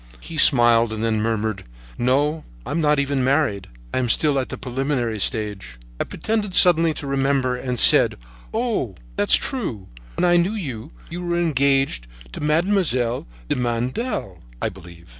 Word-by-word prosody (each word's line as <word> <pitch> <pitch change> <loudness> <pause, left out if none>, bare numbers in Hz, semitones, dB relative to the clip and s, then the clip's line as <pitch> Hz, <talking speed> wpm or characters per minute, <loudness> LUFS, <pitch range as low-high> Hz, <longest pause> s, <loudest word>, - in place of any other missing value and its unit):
He 165 - -9
smiled 120 -5 +5
and 110 0 -4
then 110 -1 0
murmured: 110 -2 -2 0.3
"No, 145 +6 0 0.2
I - - -6
am 165 - -1
not 150 -1 +2
even 140 -1 0
married. 130 -8 0 0.3
I - - 0
am 125 -2 -1
still 145 +2 +2
at 130 - -4
the - - -6
preliminary 125 -3 -2
stage." 100 - -1 0.2
I - - -1
pretended 210 -4 -3
suddenly 165 -2 +5
to - - -7
remember, 135 -2 0
and 125 0 -4
said: - - +6 0.3
"Oh! 220 - -2 0.2
that's 100 - +3
true! 135 - -3 0.3
When - - 0
I 175 0 +4
knew 175 +5 +1
you, 130 - -6 0.2
you 175 +2 -5
were 170 0 -1
engaged 135 - +1 0.2
to - - -8
Mademoiselle 150 - 0 0.2
de - - 0
Mandel, 120 - -3 0.2
I - - -1
believe." 85 -4 -14
130 Hz, 160 wpm, -21 LUFS, 115-160 Hz, 0.3 s, said